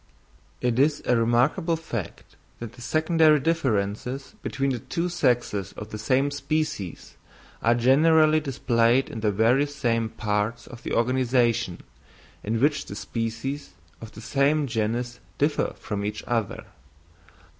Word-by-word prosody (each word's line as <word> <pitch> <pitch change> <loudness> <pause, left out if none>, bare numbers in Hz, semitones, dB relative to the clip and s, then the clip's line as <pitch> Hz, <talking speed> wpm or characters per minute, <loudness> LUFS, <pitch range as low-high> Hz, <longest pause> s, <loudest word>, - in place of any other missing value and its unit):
It 125 0 +1
is 145 +2 +2
a 125 - +3
remarkable 125 +9 +2
fact, 120 - -7 0.2
that 115 -1 -8
the 120 - -14
secondary 155 +2 +3
differences 130 -4 -1
between 135 0 -1
the 125 - -2
two 170 +8 -3
sexes 120 - 0
of 105 - -8
the 110 - -6
same 135 +5 +1
species 145 - -3 0.4
are 115 +1 +3
generally 155 +5 +5
displayed 125 -3 +1
in 115 - -5
the 105 -1 +1
very 115 +8 +3
same 115 -5 -1
parts 105 +2 -2
of 120 - -11
the - - -5
organisation 120 -4 +1 0.6
in 110 +2 -1
which 145 +3 +1
the 100 - -7
species 115 +7 -4 0.3
of 115 -1 -10
the 110 - -10
same 140 +5 +2
genus 120 0 -2 0.2
differ 145 +1 0
from 100 -1 -4
each 105 +1 -4
other. 115 -4 -2
120 Hz, 135 wpm, -25 LUFS, 115-145 Hz, 0.6 s, generally